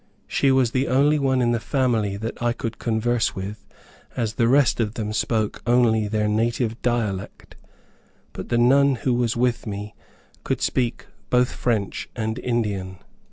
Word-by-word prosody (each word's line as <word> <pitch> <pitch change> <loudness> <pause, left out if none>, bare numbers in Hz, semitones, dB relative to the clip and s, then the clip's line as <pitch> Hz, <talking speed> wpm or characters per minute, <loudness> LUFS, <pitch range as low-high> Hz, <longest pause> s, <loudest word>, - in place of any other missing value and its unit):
She 135 - +2
was 130 -3 +3
the 130 +2 0
only 145 +4 +3
one 130 -2 +2
in 120 - +2
the 120 - +1
family 115 -6 0
that 110 +3 -6
I 120 0 +1
could 115 -1 -5
converse 115 +1 0
with, 100 +2 -7 0.5
as 115 -3 -1
the 115 0 +2
rest 135 +1 +3
of 110 -2 -1
them 105 -1 -3
spoke 110 0 -1
only 115 -3 +3
their 105 0 0
native 115 +2 0
dialect; 110 -6 -3 0.8
but - - -7
the 120 - +1
nun 135 +3 +4
who 125 +1 -1
was 120 -1 0
with 120 -1 0
me 105 0 -5 0.5
could - - -1
speak 125 -2 -1 0.2
both 125 0 +3
French 110 -6 -2
and 110 -1 -3
Indian. 100 -6 -2
115 Hz, 160 wpm, -23 LUFS, 110-125 Hz, 0.8 s, nun